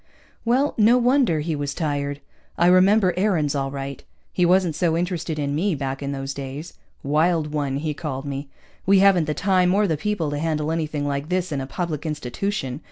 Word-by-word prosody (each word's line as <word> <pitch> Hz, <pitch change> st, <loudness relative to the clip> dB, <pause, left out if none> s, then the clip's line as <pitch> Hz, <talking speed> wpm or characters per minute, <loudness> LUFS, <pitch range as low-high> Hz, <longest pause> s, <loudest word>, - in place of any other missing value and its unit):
Well, 260 Hz, +5 st, +2 dB
no 225 Hz, +4 st, +6 dB
wonder 245 Hz, -, +3 dB
he 160 Hz, +1 st, -2 dB
was 145 Hz, -1 st, -3 dB
tired. 145 Hz, -2 st, -2 dB, 0.4 s
I 170 Hz, -, +3 dB
remember 185 Hz, +1 st, +5 dB
Aarons 180 Hz, -7 st, +1 dB
all 135 Hz, -1 st, -1 dB
right. 135 Hz, 0 st, -6 dB, 0.3 s
He 180 Hz, -1 st, +2 dB
wasn't 180 Hz, -2 st, +3 dB
so 165 Hz, +1 st, +1 dB
interested 170 Hz, -2 st, -2 dB
in 140 Hz, -1 st, -1 dB
me, 175 Hz, +4 st, 0 dB
back 135 Hz, -1 st, -4 dB
in 140 Hz, 0 st, -3 dB
those 135 Hz, 0 st, -4 dB
days. 140 Hz, +4 st, -7 dB, 0.3 s
Wild 155 Hz, +2 st, +1 dB
one, 145 Hz, -3 st, -1 dB
he 150 Hz, +1 st, -2 dB
called 145 Hz, -3 st, -5 dB
me. 140 Hz, 0 st, -5 dB, 0.4 s
_We 195 Hz, 0 st, +6 dB
haven't 190 Hz, -4 st, +5 dB
the 150 Hz, 0 st, -2 dB
time 185 Hz, -1 st, +2 dB
or 210 Hz, +1 st, +3 dB
the 160 Hz, -5 st, 0 dB
people 175 Hz, -4 st, -1 dB
to 145 Hz, -, -2 dB
handle 155 Hz, -1 st, -1 dB
anything 155 Hz, -3 st, -2 dB
like 140 Hz, +2 st, -3 dB
this 180 Hz, -1 st, -1 dB
in 140 Hz, -2 st, -2 dB
a 135 Hz, -, -5 dB
public 160 Hz, -1 st, -3 dB
institution. 150 Hz, -, -3 dB
155 Hz, 195 wpm, -23 LUFS, 145-185 Hz, 0.4 s, no